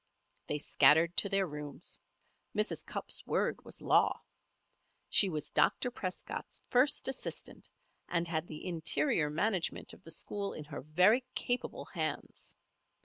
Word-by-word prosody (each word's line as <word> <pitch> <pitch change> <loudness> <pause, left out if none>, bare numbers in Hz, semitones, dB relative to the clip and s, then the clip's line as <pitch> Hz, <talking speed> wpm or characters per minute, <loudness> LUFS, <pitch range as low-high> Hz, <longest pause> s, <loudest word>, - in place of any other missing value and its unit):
They 150 - -1
scattered 150 +4 +4
to 200 - +4
their 195 -1 +2
rooms. 150 -3 -8 0.6
Mrs. 210 +1 0
Cupp's - - -4
word - - 0
was - - -11
law. - - +4 0.9
She 200 - +8
was 155 -4 -4
Dr. 200 - +2
Prescott's 185 -6 -5
first 270 +4 +3
assistant, 265 - -5 0.4
and 170 -1 0
had 165 0 -2
the 155 - -8
interior 165 - +1
management 185 +3 -1
of - - -15
the - - -12
school 200 +5 -3
in 155 - -7
her 145 0 -7
very 180 - +4
capable 245 +1 -2
hands. - - -4
175 Hz, 135 wpm, -33 LUFS, 155-210 Hz, 0.9 s, She